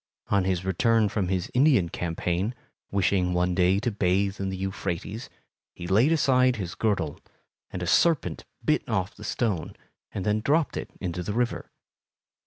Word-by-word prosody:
On 100 -2 +2
his 95 -1 -1
return 110 +3 +2
from 100 -3 -1
his 95 -1 -2
Indian 130 - +4
campaign, 90 +6 -2 0.3
wishing 95 -2 +1
one 90 +1 +1
day 90 +2 +3
to 120 0 0
bathe 100 0 +1
in 95 - -1
the 95 - -4
Euphrates, 95 +3 -4 0.5
he 85 - -7
laid 110 - +4
aside 130 -5 +4
his 95 -6 -4
girdle, 95 -9 -1 0.5
and 90 - -5
a - - -1
serpent 135 - +2 0.2
bit - - +3
off 95 +2 -1
the 105 - -12
stone 105 -6 -2 0.4
and 95 - -4
then 105 +1 +2
dropped 150 +6 +1
it - - -4
into 90 -2 -3
the 100 +4 -3
river. 120 +1 -1
95 Hz, 165 wpm, -26 LUFS, 90-115 Hz, 0.5 s, Indian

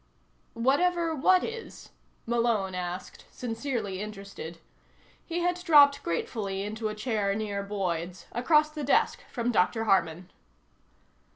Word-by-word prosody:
"Whatever 330 +8 +2
what 365 +5 +4
is?" 460 0 -7 0.3
Malone 230 -5 +1
asked, 180 0 -5
sincerely 225 -5 -4
interested. 200 -5 -8 0.7
He 345 +1 -3
had 355 0 0
dropped 285 -4 +6
gratefully 195 +2 -3
into 215 +1 -3
a 215 - -5
chair 210 -3 -1
near 205 -2 -2
Boyd's, 180 -3 -3
across 300 +5 +3
the 305 -1 -5
desk 280 - +2
from 240 -1 -1
Dr. 225 +2 +2
Harman. 180 -4 +1
225 Hz, 115 wpm, -28 LUFS, 195-285 Hz, 0.7 s, dropped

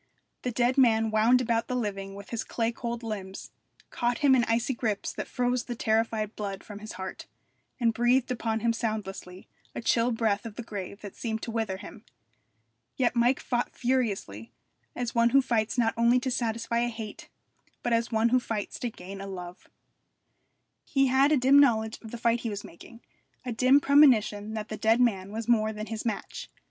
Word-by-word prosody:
The 250 - -2
dead 245 +3 +2
man 225 -3 +4
wound 225 +4 +4
about 230 -2 0
the 255 - -2
living 195 -4 -3
with 200 0 -11
his 230 -2 -2
clay 230 -1 -1
cold 235 0 -5
limbs, 195 -4 -6 0.4
caught 240 0 0
him 270 - +7
in 250 -2 +4
icy 235 +3 0
grips 220 -4 -2
that - - -5
froze 250 -1 -1
the 240 - -5
terrified 220 -1 0
blood 200 -2 -5
from 205 -1 -9
his 215 +1 -8
heart, 190 0 -7 0.5
and 230 -2 +2
breathed 245 +2 +2
upon 225 -2 -1
him 230 0 +2
soundlessly 195 -5 -5 0.3
a - - -3
chill 230 +1 +2
breath 225 -3 0
of 225 -3 -8
the 240 - -6
grave 200 -2 -7
that 205 -2 -9
seemed 220 -2 -4
to 230 - -4
wither 220 -4 -2
him. 210 +3 -11 0.9
Yet 250 -1 +1
Mike 240 +2 +3
fought 240 -1 -2
furiously, 200 - -1 0.4
as 245 -2 -3
one 235 0 +4
who 275 - +5
fights 230 -3 0
not 225 -2 +2
only 235 +2 +4
to 260 - -2
satisfy 235 -1 -1
a 240 - +1
hate, 220 -3 -8 0.5
but 240 - 0
as 230 +1 +1
one 225 +1 +3
who 255 +2 +4
fights 220 -4 -4
to 245 - -2
gain 195 -1 -9
a 195 - -6
love. 180 -2 -9 1.1
He 275 -2 +2
had 275 +3 +5
a 305 - +5
dim 270 +2 +6
knowledge 220 -5 +2
of 225 - -10
the 235 - -6
fight 235 0 +1
he 230 - -3
was 205 -1 -5
making, 230 +7 -13 0.4
a 250 - -3
dim 255 +4 +5
premonition 225 -8 +4
that 215 -1 -5
the 215 - -5
dead 220 +2 +3
man 200 -6 +1
was 225 +1 -5
more 220 -2 +3
than 215 0 -6
his 225 0 -5
match. 215 - -5
230 Hz, 195 wpm, -28 LUFS, 215-240 Hz, 1.1 s, him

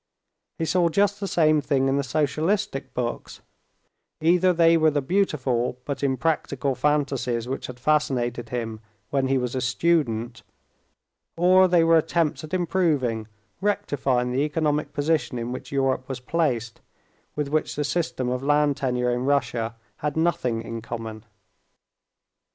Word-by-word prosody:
He 165 - -1
saw 175 +1 +2
just 200 +4 +1
the 200 - -3
same 155 -4 +3
thing 135 -2 +1
in 135 - +2
the 140 - +1
socialistic 155 +6 -1
books: 120 -1 -4 0.8
either 180 +3 +4
they 165 -1 +5
were 160 -1 +4
the 145 -1 0
beautiful 130 -7 0
but 140 - -4
impracticable 140 0 0
fantasies 130 -3 0
which 135 +2 -4
had 125 -1 -9
fascinated 125 -5 0
him 115 -3 -4 0.3
when 135 -1 +1
he 135 0 +2
was 125 -1 -2
a 130 - -1
student, 125 -5 0 1.0
or 185 +2 +6
they 175 -2 +4
were 165 0 +5
attempts 160 -1 0
at 155 - -9
improving, 155 - 0 0.3
rectifying 140 -12 0
the 130 +2 0
economic 150 0 0
position 150 -3 0
in 120 +1 -4
which 130 - -7
Europe 135 -1 0
was 135 - -4
placed, 125 -5 -1 0.5
with 150 -1 -2
which 155 +1 -1
the 150 - -1
system 145 -4 -1
of 125 +1 -1
land 145 0 +2
tenure 125 -3 0
in 125 +1 -1
Russia 125 -5 0 0.2
had 150 0 -3
nothing 125 -9 0
in 115 0 -6
common. 110 -1 -7
140 Hz, 145 wpm, -24 LUFS, 125-160 Hz, 1.0 s, or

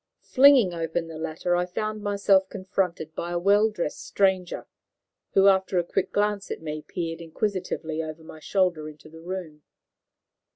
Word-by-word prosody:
Flinging 260 -8 +6
open 165 0 -2
the 160 -1 -8
latter, 165 +2 -1
I 180 0 0
found 215 +4 -3
myself 200 -2 +2
confronted 185 -4 -2
by 170 - -4
a 175 - 0
well 205 +4 +4
dressed 175 -8 -4
stranger, 190 -3 0 0.7
who, 195 - +5
after 190 -1 +3
a 175 - +3
quick - - -2
glance 205 -1 0
at - - -4
me, 155 -1 -5
peered 165 0 -5
inquisitively 165 -2 -3
over 160 0 -7
my 160 0 -11
shoulder 175 -3 0
into 155 +1 -14
the 160 +1 -13
room. 170 -4 -6
180 Hz, 160 wpm, -26 LUFS, 160-195 Hz, 0.7 s, Flinging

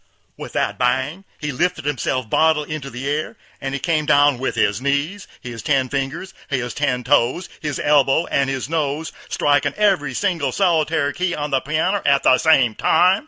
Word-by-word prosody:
With - - -9
that - - -1
bang! 130 +9 0
he 150 -1 -3
lifted 165 +2 -1
himself 130 -3 -1
bodily 155 +3 +2
into 140 -3 -5
the 125 +1 -7
a'r, 150 +2 -2 0.3
and 135 0 -3
he - - -3
come 155 -2 0
down 145 -3 +4
with 130 - -2
his - - +1
knees, 140 +8 -1
his 120 -3 -7
ten 130 0 +1
fingers, 145 +8 -4 0.2
his 125 -4 -2
ten 125 -4 -1
toes, 130 +6 +1
his 145 -3 -3
elbows, 145 +2 +3
and 140 -1 +1
his 130 -2 -3
nose, 155 0 -2 0.2
striking 145 -1 +1
every 185 -11 +1
single 170 -9 0
solitary 160 -4 +1
key 180 0 -1
on 150 0 -4
the 135 -1 +1
pianner 170 +7 0
at 140 -1 +3
the 130 - +5
same 135 -8 +4
time. 180 - +3
145 Hz, 180 wpm, -20 LUFS, 135-160 Hz, 0.3 s, the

